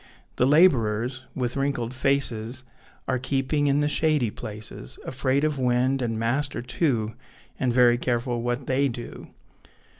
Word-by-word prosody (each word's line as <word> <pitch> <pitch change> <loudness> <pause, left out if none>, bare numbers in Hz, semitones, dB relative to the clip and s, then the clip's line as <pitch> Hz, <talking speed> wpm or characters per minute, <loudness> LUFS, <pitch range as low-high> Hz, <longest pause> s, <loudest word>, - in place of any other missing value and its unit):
The 125 - +3
labourers, 130 -5 +3
with 125 -2 -2
wrinkled 135 -4 -1
faces, 130 -2 -1 0.4
Are 130 -1 0
keeping 135 +3 0
in 140 +1 +3
the 145 - +2
shady 150 -6 +2
places, 105 - -7
Afraid 135 +1 0
of 150 -3 0
wind 130 +1 +2
and 115 -2 -1
master, 120 +3 -1
too, 120 -5 0 0.5
And 125 -2 +1
very 120 -1 +5
careful 120 -1 -1
what 120 +2 -2
they 135 +2 +2
do. 120 -2 -7
130 Hz, 140 wpm, -25 LUFS, 120-140 Hz, 0.5 s, very